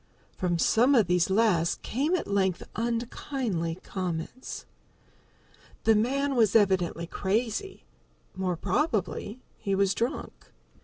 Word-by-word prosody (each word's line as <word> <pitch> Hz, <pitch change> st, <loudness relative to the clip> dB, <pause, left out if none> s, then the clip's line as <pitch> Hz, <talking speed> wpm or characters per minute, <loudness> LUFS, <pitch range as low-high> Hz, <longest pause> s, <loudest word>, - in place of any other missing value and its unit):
From 175 Hz, -2 st, 0 dB
some 245 Hz, -, +4 dB
of 225 Hz, -5 st, +5 dB
these 180 Hz, +1 st, +2 dB
last 190 Hz, -5 st, +2 dB
came 290 Hz, +9 st, 0 dB
at 360 Hz, -, -2 dB
length 190 Hz, -3 st, +1 dB
unkindly 230 Hz, -, -2 dB
comments. 185 Hz, +6 st, -5 dB, 1.2 s
The 225 Hz, -, +5 dB
man 275 Hz, +6 st, +1 dB
was 220 Hz, -4 st, +3 dB
evidently 185 Hz, -5 st, +3 dB
crazy 220 Hz, -, -2 dB, 0.5 s
more 185 Hz, -1 st, -1 dB
probably 230 Hz, -, -1 dB, 0.2 s
he 195 Hz, -1 st, -1 dB
was 195 Hz, 0 st, +2 dB
drunk. 235 Hz, +3 st, -2 dB
205 Hz, 110 wpm, -28 LUFS, 185-240 Hz, 1.2 s, of